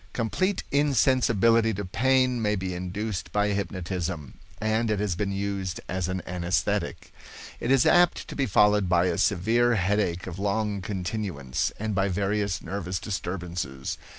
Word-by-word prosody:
Complete 185 Hz, -, 0 dB
insensibility 115 Hz, -6 st, +3 dB
to 100 Hz, +1 st, -4 dB
pain 130 Hz, +4 st, +2 dB
may 105 Hz, -1 st, +1 dB
be 95 Hz, -1 st, -3 dB
induced 90 Hz, +3 st, -4 dB
by 105 Hz, 0 st, +1 dB
hypnotism, 90 Hz, -5 st, -3 dB, 0.3 s
and 110 Hz, +1 st, 0 dB
it 105 Hz, -2 st, +1 dB
has 105 Hz, -3 st, 0 dB
been 100 Hz, +2 st, -1 dB
used 100 Hz, -2 st, -3 dB
as 90 Hz, -1 st, -2 dB
an 95 Hz, 0 st, -3 dB
anaesthetic. 90 Hz, 0 st, -1 dB, 0.5 s
It 120 Hz, -, -3 dB
is 135 Hz, -2 st, +5 dB
apt 175 Hz, 0 st, +4 dB
to -, -, -7 dB
be 135 Hz, -2 st, 0 dB
followed 105 Hz, -2 st, +4 dB
by 90 Hz, 0 st, +4 dB
a 90 Hz, -1 st, 0 dB
severe 115 Hz, +6 st, +3 dB
headache 95 Hz, -2 st, 0 dB
of 95 Hz, 0 st, -7 dB
long 100 Hz, 0 st, -1 dB
continuance, 90 Hz, -8 st, -2 dB
and 110 Hz, 0 st, -2 dB
by 95 Hz, 0 st, +1 dB
various 100 Hz, +1 st, -1 dB
nervous 95 Hz, -2 st, -3 dB
disturbances. 90 Hz, -8 st, -4 dB
100 Hz, 150 wpm, -26 LUFS, 90-110 Hz, 0.5 s, is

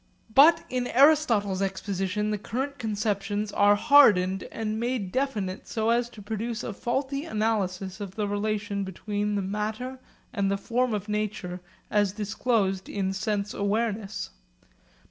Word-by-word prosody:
But 300 Hz, +7 st, +7 dB
in 250 Hz, -1 st, -2 dB
Aristotle's 240 Hz, -9 st, +4 dB
exposition 195 Hz, +1 st, -1 dB
the 210 Hz, -, -1 dB
current 265 Hz, +6 st, -4 dB
conceptions 210 Hz, -2 st, -2 dB
were 205 Hz, 0 st, +5 dB
hardened 200 Hz, -7 st, +5 dB
and 220 Hz, -1 st, -3 dB
made 235 Hz, -5 st, -2 dB
definite 215 Hz, -8 st, -2 dB
so 220 Hz, 0 st, 0 dB
as 240 Hz, 0 st, +1 dB
to 215 Hz, -4 st, -12 dB
produce 225 Hz, +3 st, -3 dB
a 215 Hz, -, -4 dB
faulty 270 Hz, +6 st, -2 dB
analysis 205 Hz, -, -1 dB
of 195 Hz, -2 st, -6 dB
the 210 Hz, -2 st, -1 dB
relation 205 Hz, 0 st, -1 dB
between 205 Hz, +2 st, -3 dB
the 200 Hz, -, 0 dB
matter 215 Hz, +6 st, -3 dB, 0.3 s
and 200 Hz, -4 st, 0 dB
the 200 Hz, -, +1 dB
form 240 Hz, +3 st, 0 dB
of 205 Hz, 0 st, -4 dB
nature 210 Hz, -4 st, -3 dB, 0.3 s
as 205 Hz, -2 st, +2 dB
disclosed 210 Hz, -2 st, -1 dB
in 195 Hz, -1 st, -1 dB
sense 200 Hz, +1 st, -2 dB
awareness. 205 Hz, -1 st, -2 dB
210 Hz, 140 wpm, -27 LUFS, 200-230 Hz, 0.3 s, But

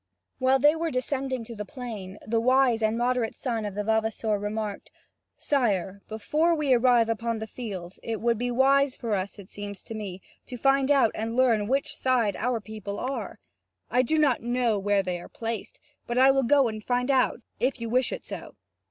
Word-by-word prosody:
While 260 Hz, +1 st, +4 dB
they 295 Hz, +4 st, +5 dB
were 330 Hz, 0 st, -1 dB
descending 260 Hz, -1 st, -2 dB
to 230 Hz, +1 st, -9 dB
the 210 Hz, -, -4 dB
plain, 210 Hz, -6 st, -7 dB
the 225 Hz, +1 st, +1 dB
wise 255 Hz, -1 st, +3 dB
and 220 Hz, +1 st, +1 dB
moderate 245 Hz, -1 st, 0 dB
son 230 Hz, -5 st, -2 dB
of 205 Hz, -2 st, -5 dB
the 210 Hz, -, -1 dB
vavasor 220 Hz, -1 st, 0 dB
remarked: 210 Hz, 0 st, -4 dB, 0.5 s
"Sire, 200 Hz, -8 st, 0 dB
before 305 Hz, +10 st, +1 dB
we 295 Hz, -4 st, +2 dB
arrive 240 Hz, -2 st, +4 dB
upon 230 Hz, 0 st, -1 dB
the 220 Hz, -, -4 dB
field, 195 Hz, -7 st, -7 dB
it 225 Hz, -2 st, -3 dB
would 235 Hz, -1 st, +1 dB
be 245 Hz, 0 st, -1 dB
wise 270 Hz, +2 st, +3 dB
for 230 Hz, -3 st, -3 dB
us, 195 Hz, +1 st, -2 dB
it 200 Hz, -1 st, -12 dB
seems 205 Hz, -2 st, -7 dB
to -, -, -8 dB
me, 200 Hz, -4 st, -6 dB, 0.3 s
to 250 Hz, -, -6 dB
find 270 Hz, +2 st, +3 dB
out 275 Hz, -6 st, +4 dB
and 225 Hz, +1 st, -3 dB
learn 245 Hz, -4 st, +4 dB
on 205 Hz, -, -3 dB
which 275 Hz, +4 st, 0 dB
side 240 Hz, -6 st, +1 dB
our 245 Hz, 0 st, -1 dB
people 205 Hz, -1 st, -7 dB
are. 265 Hz, +2 st, -4 dB, 0.5 s
I 250 Hz, -, +4 dB
do 285 Hz, +5 st, 0 dB
not 290 Hz, -5 st, +3 dB
know 240 Hz, -3 st, +1 dB
where 200 Hz, 0 st, +2 dB
they 180 Hz, -2 st, -3 dB
are -, -, -11 dB
placed, 225 Hz, -2 st, -5 dB, 0.3 s
but 240 Hz, -, -2 dB
I 265 Hz, +1 st, +7 dB
will 270 Hz, 0 st, +2 dB
go 270 Hz, +1 st, +4 dB
and 215 Hz, -1 st, -5 dB
find 250 Hz, +3 st, +1 dB
out, 260 Hz, -1 st, +2 dB, 0.2 s
if 260 Hz, +1 st, 0 dB
you 230 Hz, -, -4 dB
wish 250 Hz, +3 st, +1 dB
it -, -, -6 dB
so." -, -, -8 dB
235 Hz, 205 wpm, -27 LUFS, 215-260 Hz, 0.5 s, I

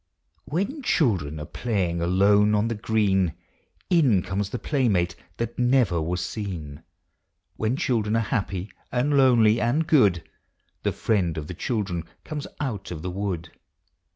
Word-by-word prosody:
When 200 Hz, -, -2 dB
children 90 Hz, -, +1 dB
arc 75 Hz, -, -9 dB
playing 95 Hz, -8 st, -1 dB
alone 100 Hz, +4 st, +4 dB
on 105 Hz, +2 st, +1 dB
the -, -, 0 dB
green, 105 Hz, -5 st, +1 dB, 0.6 s
In 130 Hz, -, +4 dB
comes 95 Hz, +2 st, -2 dB
the 125 Hz, -, -3 dB
playmate 105 Hz, -, +1 dB, 0.2 s
that 115 Hz, +1 st, -4 dB
never 120 Hz, -9 st, +3 dB
was 85 Hz, +2 st, -2 dB
seen. 85 Hz, -9 st, -6 dB, 0.7 s
When 110 Hz, +3 st, 0 dB
children 110 Hz, -5 st, 0 dB
are 115 Hz, +3 st, -1 dB
happy 95 Hz, -3 st, -2 dB, 0.2 s
and 135 Hz, +4 st, +1 dB
lonely 120 Hz, -5 st, +5 dB
and 130 Hz, +8 st, +1 dB
good, 100 Hz, -, +4 dB, 0.6 s
The -, -, 0 dB
Friend 90 Hz, -8 st, 0 dB
of 75 Hz, -, -4 dB
the 90 Hz, -, -6 dB
Children 90 Hz, -4 st, -2 dB, 0.2 s
comes 150 Hz, -2 st, -5 dB
out 110 Hz, -9 st, -3 dB
of 80 Hz, -3 st, -6 dB
the 90 Hz, -, -3 dB
wood. 90 Hz, -4 st, -3 dB
105 Hz, 145 wpm, -25 LUFS, 90-120 Hz, 0.7 s, lonely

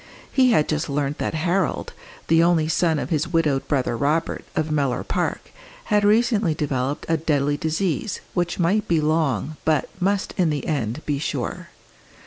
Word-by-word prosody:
He 255 Hz, -2 st, +4 dB
had 180 Hz, -11 st, +3 dB
just 155 Hz, 0 st, -1 dB
learnt 140 Hz, 0 st, -1 dB
that -, -, -2 dB
Harold, 175 Hz, +4 st, 0 dB, 0.3 s
the 165 Hz, 0 st, +5 dB
only 170 Hz, -2 st, +3 dB
son 160 Hz, 0 st, +2 dB
of 145 Hz, -, -4 dB
his 155 Hz, 0 st, +1 dB
widowed 155 Hz, -5 st, +1 dB
brother 130 Hz, -5 st, 0 dB
Robert, 150 Hz, +7 st, 0 dB
of 155 Hz, 0 st, -1 dB
Mellor 140 Hz, -4 st, 0 dB
Park, -, -, -2 dB, 0.4 s
had 210 Hz, 0 st, +4 dB
recently 215 Hz, -5 st, +3 dB
developed 140 Hz, -2 st, -2 dB
a 165 Hz, -, +2 dB
deadly 145 Hz, -2 st, +1 dB
disease, 175 Hz, -, -1 dB
which 175 Hz, -1 st, -1 dB
might 190 Hz, +5 st, +1 dB
be 165 Hz, -2 st, +2 dB
long, 155 Hz, -3 st, 0 dB
but 155 Hz, -4 st, +1 dB
must 195 Hz, +2 st, 0 dB
in 180 Hz, -4 st, +3 dB
the 145 Hz, -3 st, -2 dB
end 135 Hz, -2 st, -2 dB
be 145 Hz, -2 st, -1 dB
sure. 145 Hz, -, -3 dB
155 Hz, 165 wpm, -23 LUFS, 145-175 Hz, 0.4 s, the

